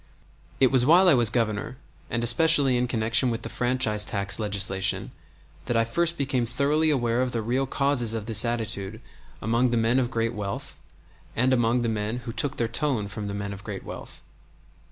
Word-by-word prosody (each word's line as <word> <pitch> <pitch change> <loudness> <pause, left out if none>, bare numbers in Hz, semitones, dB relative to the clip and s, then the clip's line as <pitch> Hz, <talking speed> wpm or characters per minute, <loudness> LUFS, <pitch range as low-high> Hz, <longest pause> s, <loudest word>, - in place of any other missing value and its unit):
It 130 -2 +4
was 130 -2 +5
while 175 +7 +5
I 175 - +7
was 120 -5 +4
Governor, 115 +1 -2 0.3
and 115 0 -2
especially 140 +2 +5
in 125 0 0
connection 120 +2 +1
with 115 -1 -4
the - - -5
franchise 120 -4 0
tax 100 -1 -2
legislation, 100 -2 -1 0.5
that 120 - 0
I 115 - +2
first 170 +8 0
became 130 -4 -1
thoroughly 145 +6 +1
aware 120 -4 +1
of 130 -1 -2
the 115 -2 -2
real 130 +4 -1
causes 130 -5 +1
of 110 -2 -4
this 110 -1 +2
attitude 110 -3 -3 0.4
among 115 +4 +1
the 120 - 0
men 115 +3 +2
of 125 -2 -1
great 115 -1 -1
wealth 100 -3 -5 0.6
and 130 +3 +2
among 120 0 +1
the - - 0
men 110 +1 -2
who 115 - -5
took 140 +2 -3
their 115 - 0
tone 115 -3 -2
from 105 +1 -6
the 100 - -4
men 100 0 -4
of 100 0 -11
great 100 -2 -7
wealth. - - -9
120 Hz, 195 wpm, -25 LUFS, 110-130 Hz, 0.6 s, I